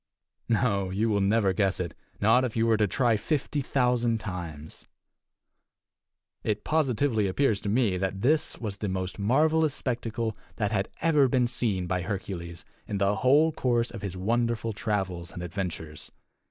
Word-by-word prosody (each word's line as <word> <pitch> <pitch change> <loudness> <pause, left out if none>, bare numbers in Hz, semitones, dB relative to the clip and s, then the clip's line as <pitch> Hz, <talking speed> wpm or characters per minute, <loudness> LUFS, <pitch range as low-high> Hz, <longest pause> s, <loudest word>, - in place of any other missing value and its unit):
No, 100 -4 +1
you 105 +5 0
will 100 -2 +2
never 100 -1 +3
guess 95 +1 +1
it 85 -3 -3 0.3
not 115 +5 +4
if 120 -3 -2
you 115 - +3
were 115 -1 +4
to 105 -1 +2
try 120 +1 +2
fifty 145 +4 -1
thousand 125 -3 +1
times! 85 -7 -7 1.6
It 105 -1 -1
positively 135 -7 +1
appears 105 +1 +1
to 100 - -3
me 105 -4 +2
that 95 0 -2
this 150 +4 +2
was 105 -4 -4
the 105 0 -3
most 95 +1 -3
marvelous 155 +7 +3
spectacle 115 -3 -2 0.2
that 105 -2 -1
had 100 -2 0
ever 150 -5 +4
been 125 -1 +2
seen 110 -6 0
by 90 0 -1
Hercules 90 -3 -5 0.2
in 105 - -2
the 100 +1 +2
whole 145 +9 +4
course 120 -5 0
of 115 - -8
his 95 -3 -5
wonderful 115 +3 0
travels 95 -6 -2
and 90 - -7
adventures. 85 -4 -5
110 Hz, 160 wpm, -27 LUFS, 95-120 Hz, 1.6 s, not